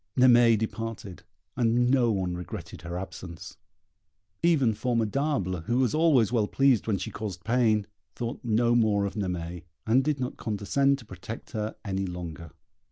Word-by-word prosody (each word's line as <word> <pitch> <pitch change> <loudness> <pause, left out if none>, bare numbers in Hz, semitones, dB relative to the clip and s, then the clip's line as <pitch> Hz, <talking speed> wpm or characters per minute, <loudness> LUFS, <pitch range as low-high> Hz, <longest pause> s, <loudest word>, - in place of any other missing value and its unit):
Naimée 120 -3 +6
departed, 110 -3 -5 0.3
and 120 0 +2
no 125 -4 +3
one 95 -4 -1
regretted 90 0 -7
her 85 +1 -5
absence. 90 -2 -8 0.8
Even 150 -9 +3
Formidable, 115 - -1
who 120 +2 0
was 130 -4 +2
always 150 -9 +4
well 110 -4 +2
pleased 135 -4 +2
when 105 -3 +1
she 95 - -5
caused 100 -5 -6
pain, 110 -2 +2 0.3
thought 120 +1 -4
no 120 +1 +2
more 110 -4 +3
of 100 - -3
Naimée, 90 -4 -4 0.2
and 125 +4 +3
did 150 -1 0
not 125 -1 -3
condescend 125 +6 +1
to 125 - -13
protect 95 +3 -9
her 110 0 -3
any 95 -1 -2
longer. 85 -2 -7
110 Hz, 155 wpm, -27 LUFS, 95-125 Hz, 0.8 s, Naimée